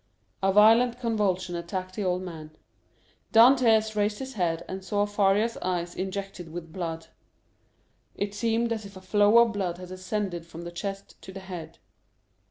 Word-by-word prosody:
A 195 0 +3
violent 225 +4 +5
convulsion 200 -7 0
attacked 185 +2 -5
the 210 - -2
old 180 0 0
man. 155 -3 -9 0.7
Dantès 225 -2 +5
raised 210 0 0
his 265 +2 -6
head 170 -4 -1
and 190 0 -6
saw 205 +1 0
Faria's 205 +2 +1
eyes 175 -1 -3
injected 190 -3 -5
with 165 -1 -8
blood. 165 -2 -5 1.1
It 200 0 -3
seemed 230 +2 0
as 220 -1 -5
if 200 -1 -11
a - - -8
flow 205 +3 +4
of 235 -1 +5
blood 185 -4 -2
had 180 0 -10
ascended 185 -2 -4
from 170 0 -9
the 170 - -7
chest 195 +2 -6
to - - -10
the 190 0 -8
head. 175 -4 -8
195 Hz, 165 wpm, -27 LUFS, 175-215 Hz, 1.1 s, violent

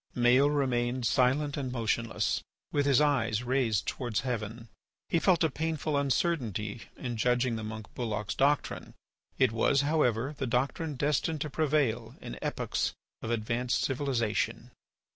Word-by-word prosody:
Maël 125 +3 +5
remained 125 -3 0
silent 135 +5 +2
and 135 -3 -3
motionless, 115 -1 0 0.3
with 145 -1 +1
his 135 -3 +5
eyes 125 -7 +2
raised 120 -5 +1
towards 120 -5 -1
heaven; 115 -2 -4 0.4
he 165 - +3
felt 175 -1 +3
a 160 - +3
painful 155 0 -2
uncertainty 125 - 0 0.2
in 120 -3 -4
judging 125 +1 +2
the 110 - -4
monk 110 0 -6
Bulloch's 110 -4 -2
doctrine. 145 +2 0 0.4
It 130 -4 +4
was, 115 +4 +3
however, 140 -3 +1
the 135 -2 -3
doctrine 135 +5 -1
destined 150 +3 0
to 150 - -3
prevail 135 -7 0
in 65 - -8
epochs - - -1 0.3
of 110 - -4
advanced 120 +2 0
civilization. 130 -5 -1
125 Hz, 140 wpm, -30 LUFS, 115-145 Hz, 0.4 s, Maël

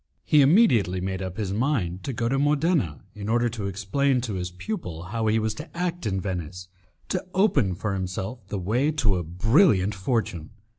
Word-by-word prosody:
He 150 - +5
immediately 135 - +4
made 95 +1 -3
up 95 -1 -5
his 100 -3 -2
mind 105 - -1
to 140 - -2
go 115 -1 -1
to 135 +3 +1
Modena 145 - +1
in 105 -1 -6
order 120 +1 +2
to 110 -4 -4
explain 125 +8 0
to 115 -4 -4
his 90 -1 -3
pupil 90 - -5
how 110 +5 -2
he 110 +1 +3
was 110 -1 0
to 150 +6 -10
act 175 -7 -2
in 95 -2 -1
Venice 90 -1 -5 0.4
to 185 - -1
open 145 - +3
for 105 +2 -2
himself 95 +4 -4
the 100 - -3
way 115 +10 +1
to 105 -10 +2
a 90 - -2
brilliant 105 - +3
fortune. 95 - -2
105 Hz, 190 wpm, -25 LUFS, 95-135 Hz, 0.4 s, He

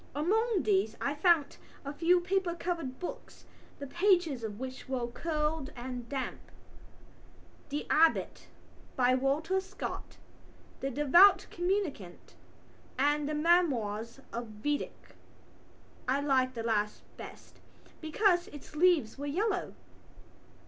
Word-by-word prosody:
Among 415 - +1
these 215 0 +1
I 280 - -1
found 310 -1 +2 0.3
a 280 - -4
few 350 +3 +3
paper 365 -1 0
covered 335 -7 -3
books, 360 - -8 0.3
the 285 - -6
pages 345 - +2
of 210 -1 -5
which 260 0 -7
were 255 -2 -1
curled 300 +2 -2
and 245 -1 -6
damp: 270 -2 -3 1.3
The 295 +1 -3
Abbot, 320 +1 +2 0.5
by 255 -1 +3
Walter 285 +8 +1
Scott, 385 +1 -7 0.6
The 270 - -2
Devout 295 +9 +6
Communicant 350 - -3 0.6
and 290 +2 +1
The 305 - -1
Memoirs 265 -9 +1
of 235 0 -4 0.2
Vidocq. 295 0 -3 0.9
I 265 +2 +2
liked 260 -3 +1
the 230 - -4
last 210 -2 -1
best - - -11 0.4
because 350 +2 +2
its 295 +1 -12
leaves 310 -8 +3
were 285 - -4
yellow. 380 +5 -1
295 Hz, 115 wpm, -31 LUFS, 255-345 Hz, 1.3 s, Devout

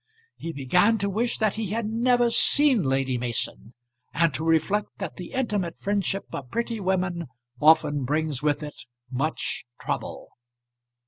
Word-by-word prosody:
He 165 - -6
began 180 - +3
to 200 -1 -1
wish 230 +4 0
that 215 -2 +1
he 220 -1 -3
had 220 +4 -2
never 240 +2 +2
seen 280 -2 +5
Lady 135 -3 0
Mason, 120 -1 -3 0.4
and 165 -2 +3
to 145 +5 -3
reflect 165 +6 +1
that 190 -6 -6
the 180 +5 -8
intimate 210 -10 -1
friendship 200 -1 -1
of 130 -3 -6
pretty 235 - -2
women 185 -3 -1 0.3
often 150 -2 +5
brings 150 0 -1
with 150 0 0
it 150 -3 -9 0.2
much 140 +5 -2 0.2
trouble. - - -4
180 Hz, 145 wpm, -25 LUFS, 150-215 Hz, 0.4 s, seen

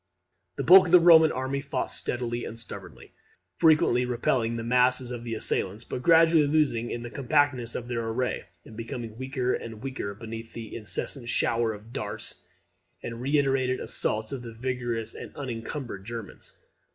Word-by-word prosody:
The - - -3
bulk 185 +1 +8
of - - -3
the 180 - +9
Roman 160 -2 +7
army 130 +2 -2
fought 140 -2 -3
steadily 120 -1 -1
and 115 - -6
stubbornly, 115 - -6 0.4
frequently 155 -7 +4
repelling 120 -1 0
the 115 - -4
masses 125 +1 +3
of 120 -1 -6
the 115 -1 -4
assailants, 105 0 0
but 125 - -5
gradually 165 0 +5
losing 140 -6 +1 0.2
the 120 - -7
compactness 140 -3 +1
of 120 - -5
their 115 -2 -3
array, 125 +3 -2 0.2
and 110 - -12
becoming 115 0 -6
weaker 130 -1 -1
and 110 -1 -6
weaker 130 -7 -4
beneath 115 +1 -8
the 115 -2 -8
incessant 120 +3 -1
shower 115 -1 +1
of 110 +2 -11
darts - - -5 0.6
and - - -4
the - - -8
reiterated 135 -1 +1
assaults 110 0 0
of 135 -3 -5
the 115 -1 -9
vigorous 120 -2 -3
and - - -10
unencumbered 120 -4 -6
Germans. 115 0 -8
120 Hz, 165 wpm, -27 LUFS, 115-135 Hz, 0.6 s, the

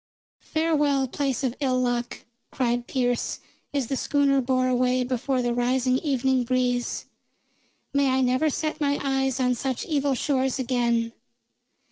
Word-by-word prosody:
"Farewell, 295 -4 +2
place 275 0 -2
of 255 -2 -1
ill 260 -3 +1
luck!" 245 -1 -2 0.2
cried 240 -1 -1
Pearce, 245 -2 -1 0.3
as 280 -3 0
the 270 - -2
schooner 275 0 +2
bore 255 0 +1
away 255 0 +2
before 255 +1 -1
the 240 0 0
rising 255 +1 +1
evening 265 -3 +1
breeze. 245 0 0 0.9
"May 280 -1 +3
I 260 0 +2
never 255 +5 +2
set 310 +2 -3
my 285 -1 +1
eyes 270 -1 0
on 250 -1 +2
such 255 +1 -3
evil 285 -3 0
shores 265 0 0
again." 235 -3 0
260 Hz, 140 wpm, -25 LUFS, 245-275 Hz, 0.9 s, May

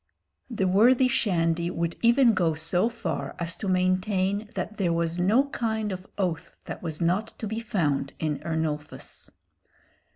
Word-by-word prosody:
The 200 -6 0
worthy 240 +7 +5
Shandy 170 -7 +1
would 170 -1 -2
even 235 0 +5
go 170 -5 +1
so 175 +7 +2
far 235 0 -4
as 170 -1 -3
to 205 - -4
maintain 185 +2 +1
that 215 - -4
there 180 -4 +1
was 170 +1 -1
no 215 +10 +4
kind 220 -4 -1
of 185 0 -6
oath 175 -5 -2
that - - -7
was 160 -2 -4
not 180 +6 +1
to - - -5
be 220 +2 -3
found 155 -11 -1
in 155 -2 -2
Ernulphus. 155 -2 -4
185 Hz, 155 wpm, -26 LUFS, 165-220 Hz, -, worthy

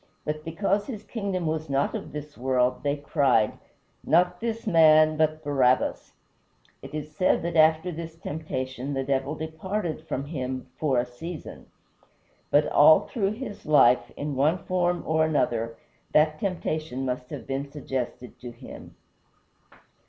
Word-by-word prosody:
But 155 0 -3
because 195 +5 -1
his 215 -6 -6
kingdom 200 -5 -3
was 155 -1 -2
not 140 0 +1
of - - -5
this 150 0 -8
world 125 0 +1
they 145 0 0
cried: 140 -6 +1 0.4
"Not 180 +2 +3
this 230 -1 -3
man, 155 -4 +6
but 155 0 0
Barabbas!" 130 -3 +1 0.7
It - - -9
is 150 0 -6
said 185 - +2
that 170 0 -3
after 160 +2 +4
this 165 0 -7
temptation 135 -4 -4
the 135 - -1
Devil 135 +2 -1
departed 160 +3 -4
from 135 - -3
him 130 -4 -4
"for 140 -5 +1
a 120 - +2
season." 155 +7 -9 0.8
But 145 +1 +4
all 155 +2 +7
through 205 -4 -2
his 215 -2 -7
life, 135 -5 +5
in 145 0 -3
one 150 +6 +2
form 180 -1 0
or 160 0 +2
another, 115 -7 0 0.4
that 155 0 +3
temptation 155 -8 -3
must 125 0 -3
have - - -7
been 135 +1 -3
suggested 130 -4 -5
to 125 - -8
him. 120 0 -12
155 Hz, 145 wpm, -26 LUFS, 135-165 Hz, 0.8 s, all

